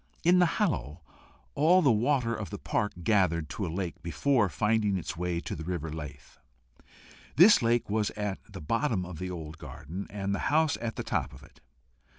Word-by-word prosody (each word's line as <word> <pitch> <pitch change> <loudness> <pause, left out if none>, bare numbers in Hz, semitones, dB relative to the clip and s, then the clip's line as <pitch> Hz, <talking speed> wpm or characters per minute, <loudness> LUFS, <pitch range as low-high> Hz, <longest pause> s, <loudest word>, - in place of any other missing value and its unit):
In 180 +2 +5
the 180 - +5
hollow 90 - -1 0.5
all 175 +5 +4
the 140 - +5
water 115 +1 +1
of 110 -3 -5
the 105 - -6
park 105 +1 -1
gathered 85 -6 +2
to 100 - -3
a - - -4
lake 90 0 -4
before 95 - +1
finding 105 +1 +1
its 85 -1 -5
way 90 0 -2
to - - -5
the 80 - -7
river 80 -2 -4
Lythe. 75 -2 -9 1.0
This 185 +3 +7
lake 120 0 +1
was 105 0 0
at 105 -2 -2
the - - -8
bottom 115 - 0
of 90 -3 -8
the 90 - -4
old 80 -3 -7
garden, 80 +7 -7
and 100 -1 -3
the 100 - -1
house 155 0 +3
at 115 -1 -4
the - - -4
top - - -2
of - - -14
it. - - -19
100 Hz, 190 wpm, -29 LUFS, 85-120 Hz, 1.0 s, This